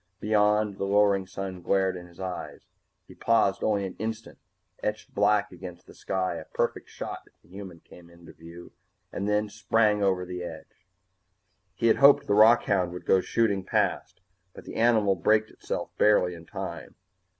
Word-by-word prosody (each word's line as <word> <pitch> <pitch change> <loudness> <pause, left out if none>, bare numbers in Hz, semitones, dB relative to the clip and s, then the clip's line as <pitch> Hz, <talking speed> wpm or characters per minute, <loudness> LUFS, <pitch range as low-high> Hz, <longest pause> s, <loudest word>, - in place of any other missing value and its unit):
Beyond, 105 -1 +1
the - - -1
lowering 100 -1 +2
sun 95 -1 -6
glared 95 +1 +1
in 90 -1 -9
his 85 -1 -20
eyes. 95 -1 -6 0.4
He - - -13
paused 105 -4 +1
only 100 -2 +1
an 95 - -7
instant, 110 +1 -5 0.4
etched 105 +1 -4
black 105 0 +2
against 90 -1 -10
the - - -15
sky, 95 -3 -3
a 80 - -8
perfect - - -3
shot - - -6
if - - -28
the - - -25
human 95 -3 -10
should - - -36
come 85 -1 -18
into 85 -1 -16
view, 85 +2 -13 0.4
and 100 +1 -3
then 105 0 +2
he 105 - -8
sprang 105 +1 +1
over 95 -2 +1
the 90 0 -6
edge. 85 +2 -10 0.9
He 115 - -3
had 115 - +4
hoped 140 0 +6
the 100 - 0
rockhound 100 -4 +4
would 90 - -9
go 95 - +4
shooting 100 -4 0
past, 95 - -1 0.3
but - - -12
the - - -9
animal 110 -4 +3
braked 110 +4 +1
itself - - -5
barely 95 -4 +4
in 85 -1 -12
time. - - -7
100 Hz, 180 wpm, -27 LUFS, 90-105 Hz, 0.9 s, hoped